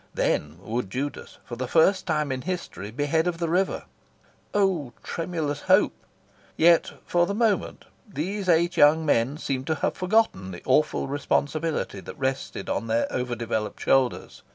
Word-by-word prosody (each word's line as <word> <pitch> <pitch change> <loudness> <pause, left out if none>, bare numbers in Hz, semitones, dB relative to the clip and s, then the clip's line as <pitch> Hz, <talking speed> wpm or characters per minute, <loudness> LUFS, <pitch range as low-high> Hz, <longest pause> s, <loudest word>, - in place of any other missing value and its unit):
Then 75 +3 0
would 115 -2 -3
Judas, 140 +7 -5
for 120 - -6
the 125 +1 -4
first 185 +7 +3
time 150 -4 0
in 130 -1 -3
history, 170 - -5
be 140 +6 -2
head 160 +3 +1
of 175 -1 -1
the 170 0 -1
river. 180 +4 0 0.7
Oh 185 -11 +1
tremulous 160 -4 -3
hope! - - +4 0.6
Yet, 170 +1 +4
for 175 0 +2
the 200 - -2
moment, 220 -3 0 0.2
these 190 +3 -3
eight 170 +1 +3
young 155 +2 +5
men 135 0 +2
seemed 135 -3 -3
to 160 - +1
have - - -1
forgotten 185 - +1
the 90 -2 -9
awful 135 +2 +2
responsibility 145 +3 -1
that - - -10
rested 135 -1 -3
on 115 - -2
their 115 +1 +1
over 125 -1 -2
developed 110 -2 -3
shoulders. 130 -2 +1
150 Hz, 160 wpm, -25 LUFS, 125-175 Hz, 0.7 s, young